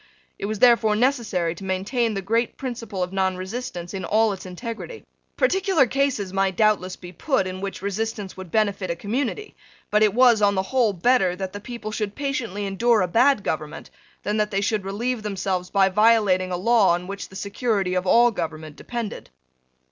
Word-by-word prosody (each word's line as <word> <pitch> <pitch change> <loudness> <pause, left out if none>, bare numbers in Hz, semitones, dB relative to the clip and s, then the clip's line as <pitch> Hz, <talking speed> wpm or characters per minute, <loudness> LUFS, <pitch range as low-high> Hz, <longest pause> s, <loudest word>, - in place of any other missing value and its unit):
It 200 - -3
was 215 0 -3
therefore 230 -2 +5
necessary 220 -9 +1
to 175 - -11
maintain 205 +5 -1
the 195 - -3
great 230 +4 0
principle 230 -7 -4
of 180 +1 -5
nonresistance 190 0 -3
in 190 -1 -4
all 215 +3 +2
its 190 -1 -9
integrity. 230 - -7 0.3
Particular 385 - +3
cases 255 -7 -1
might 195 -1 +1
doubtless 210 -4 +2
be 175 -1 -11
put 195 - 0
in 185 0 -5
which 195 -1 -5
resistance 205 0 -3
would 190 -1 -9
benefit 200 -2 0
a 170 - -1
community: 255 - -3 0.4
but 210 - +3
it 215 -1 +3
was, 245 -3 +5
on 200 -1 +3
the 190 - +1
whole, 235 +1 +2
better 195 -1 +2
that 190 0 -5
the 205 - -6
people 230 -1 -7
should 210 -2 -3
patiently 235 -8 -3
endure 220 +4 +2
a - - 0
bad 235 +4 +3
government 155 0 -4 0.3
than 210 +2 -1
that 210 0 +1
they 195 - -1
should 205 -1 -1
relieve 230 +5 -2
themselves 190 -3 -2
by 195 -1 +4
violating 200 -2 +3
a 180 - -1
law 200 -2 +4
on 175 +1 -6
which 200 +1 -7
the 190 - -14
security 200 -1 -1
of 185 0 -1
all 240 +5 +5
government 155 -5 -5
depended. 235 -4 -6
205 Hz, 185 wpm, -23 LUFS, 185-235 Hz, 0.4 s, therefore